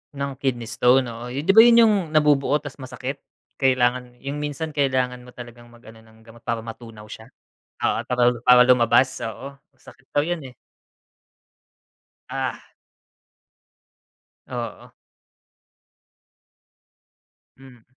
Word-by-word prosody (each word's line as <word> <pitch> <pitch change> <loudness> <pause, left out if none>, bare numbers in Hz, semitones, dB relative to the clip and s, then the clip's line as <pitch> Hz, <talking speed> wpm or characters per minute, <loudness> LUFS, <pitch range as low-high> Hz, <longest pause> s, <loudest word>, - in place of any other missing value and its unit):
Ng 140 0 -3
kidney 125 -4 -2
stone? 125 +2 +3
Oo, 115 +1 -8
yun 130 +4 -5
diba 195 +6 +5
yun 235 0 +7
yung 220 -2 +4 0.2
nabubuo 145 -2 +3
tas 145 -1 -10
masakit 130 +1 -6 0.4
kailangan 125 -2 +1
yung 140 +2 -5
minsan 150 +1 -4
kailangan 130 -4 -1
mo 125 - -15
talagang 120 -1 -12
mag 120 0 -19
ano 110 +1 -14
ng 110 0 -21
gamot 115 +1 -18
para 115 -2 -2
matunaw 115 -2 -11
siya. 110 - -10 0.6
Oo, - - 0
para 125 0 -2 0.2
para 125 0 +7
lumabas. 125 +1 +3
Oo 135 +5 -8 0.2
masakit 130 0 -19
daw - - +2
yun 170 0 -3
eh. 130 - -11 1.8
Ah, - - -4 1.8
Oo. - - -7 2.7
Mm. 125 -4 -17
125 Hz, 120 wpm, -22 LUFS, 120-140 Hz, 2.7 s, yun